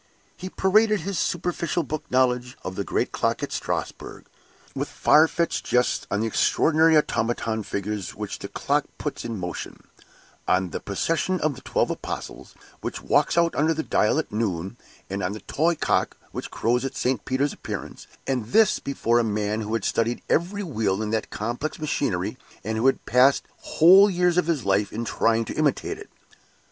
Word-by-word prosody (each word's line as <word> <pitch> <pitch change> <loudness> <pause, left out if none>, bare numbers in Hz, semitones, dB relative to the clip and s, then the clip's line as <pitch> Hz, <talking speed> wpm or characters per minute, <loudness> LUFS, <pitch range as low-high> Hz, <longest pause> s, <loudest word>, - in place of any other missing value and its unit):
He 185 - -7
paraded 210 +2 +3
his 190 0 -3
superficial 175 0 -1
book 155 +2 -5
knowledge 125 -1 +1
of 95 - -4
the 100 - -2
great - - -1
clock - - -1
at - - -3
Strasbourg, - - -4 0.5
with - - -3
far 155 +2 +5
fetched 170 +1 -1
jests 125 0 +1
on 105 - 0
the - - 0
extraordinary 160 +7 +3
automaton 115 -5 0
figures 100 -1 -4
which - - -5
that - - -9
clock - - +1
puts - - -4
in 115 -2 -4
motion 90 -2 -6 0.6
on 90 -1 +1
the - - -3
procession 165 - -1
of 155 -1 +1
the 130 - -12
Twelve - - 0
Apostles, - - -6 0.2
which - - -5
walks - - +2
out 170 0 +3
under 160 +2 +2
the 160 - -2
dial 105 - +2
at 160 - -2
noon, 100 -3 -2 0.3
and 100 +1 -4
on 90 +2 -1
the 105 - -8
toy 165 +3 +1
cock, - - 0
which - - -6
crows 120 +3 0
at 135 0 -4
St. 125 -3 0
Peter's 135 +2 0
appearance - - -7 0.2
and 125 -5 -1
this 220 - +4
before 120 -4 +1
a - - +2
man 105 0 -1
who 110 +1 -2
had 115 - -2
studied 115 +1 0
every 195 +5 0
wheel 110 - -1
in 105 - -3
that 110 -1 -1
complex 120 +8 -3
machinery, 155 -1 -2 0.2
and 110 +2 -2
who 125 - +3
had 135 - +1
passed 130 +2 +4
whole 190 +5 +6
years 180 -1 +2
of 180 - -1
his 155 -9 0
life 100 +1 +1
in 115 +2 -4
trying 115 0 +1
to - - -5
imitate 155 - 0
it. 425 - -11
125 Hz, 180 wpm, -24 LUFS, 110-165 Hz, 0.6 s, whole